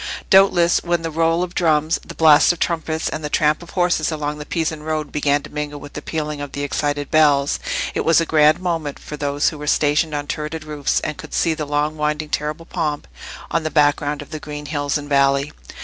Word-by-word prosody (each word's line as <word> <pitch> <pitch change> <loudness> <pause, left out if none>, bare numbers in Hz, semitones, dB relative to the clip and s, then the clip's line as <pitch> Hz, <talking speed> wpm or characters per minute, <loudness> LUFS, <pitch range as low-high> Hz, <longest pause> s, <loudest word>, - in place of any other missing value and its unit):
Doubtless 185 -3 +5
when 175 -1 0
the 165 - -3
roll 165 +2 +1
of 180 -1 -5
drums, 160 -2 +2
the - - -10
blast 155 -1 +6
of 175 - -4
trumpets, 160 -1 -1
and 155 - -4
the 150 - -3
tramp 150 +1 +2
of 170 - -12
horses 175 -3 +1
along 150 -1 -3
the 150 - -8
Pisan 160 -2 -2
road 155 -1 -3
began 145 -1 +1
to - - -12
mingle 150 -1 -4
with 145 0 -11
the 150 - -6
pealing 150 -2 -4
of 145 -1 -7
the 140 - -3
excited 145 0 -2
bells, 145 -3 +3 0.3
it - - -1
was 165 -1 +4
a 165 - +1
grand 155 0 +4
moment 165 -5 -2
for 150 - -8
those 145 0 0
who 155 - -9
were 150 - -6
stationed 150 +1 +2
on 145 0 -3
turreted 155 +2 -4
roofs, 150 -2 -1
and 150 - -4
could - - -8
see 165 - +2
the 155 -2 -5
long 150 +1 -1
winding 150 0 -1
terrible 150 +3 -3
pomp 150 - -3 0.4
on 165 - +1
the 155 - -2
background 145 -1 +1
of - - -19
the 155 - -5
green 150 0 -7
hills 145 -1 -1
and 145 -1 -7
valley. 140 +1 +2
150 Hz, 225 wpm, -20 LUFS, 145-160 Hz, 0.4 s, blast